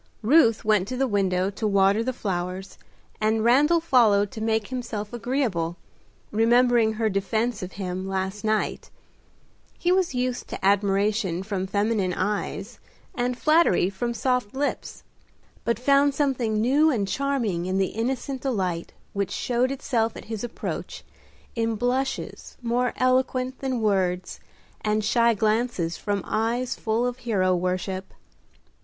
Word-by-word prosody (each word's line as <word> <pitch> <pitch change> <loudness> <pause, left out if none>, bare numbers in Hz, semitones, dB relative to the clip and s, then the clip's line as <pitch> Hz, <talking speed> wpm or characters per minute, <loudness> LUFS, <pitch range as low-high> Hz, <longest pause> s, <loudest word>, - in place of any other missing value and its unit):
Ruth 230 -3 +4
went 210 -3 +3
to 255 - -4
the 270 - +2
window 190 -3 +1
to 215 +2 -2
water 200 +2 +3
the 255 - -1
flowers, 190 -4 -4 0.4
and 220 +1 +2
Randal 290 +8 +4
followed 225 -10 +3
to 220 - -7
make 220 -1 0
himself 235 -4 -5
agreeable, 225 -9 -1 0.5
remembering 235 0 +4
her 220 0 0
defence 215 +3 -1
of 185 0 -6
him 185 -1 -4
last 190 +1 -3
night. 215 0 -1 0.9
He 355 - +1
was 370 -7 +2
used 250 0 -2
to - - -5
admiration 200 -2 +1
from 195 -2 -3
feminine 200 -2 0
eyes, 200 +2 -3 0.3
and 245 -1 -1
flattery 305 - +3
from 235 +5 -3
soft 250 -1 -1
lips, 285 +2 -3 0.6
but 235 -1 0
found 280 +3 +3
something 250 -7 0
new 280 +8 +4
and 215 -9 0
charming 235 -10 -1
in 185 +1 0
the 190 -1 +1
innocent 255 +3 -2
delight 185 -10 -2 0.2
which 200 -1 -1
showed 245 +4 0
itself 235 -4 -1
at - - -10
his 220 0 -5
approach 240 - -5 0.5
in 225 -1 0
blushes 255 +4 -2
more 245 +1 0
eloquent 255 0 +1
than 260 -3 -2
words, 185 -4 0 0.4
and 215 0 +1
shy 235 +1 +3
glances 215 -5 0
from 200 -2 -2
eyes 235 +3 -1
full 225 +2 -1
of 245 0 -3
hero 195 -7 +1
worship. 185 +1 -3
220 Hz, 140 wpm, -25 LUFS, 195-250 Hz, 0.9 s, Ruth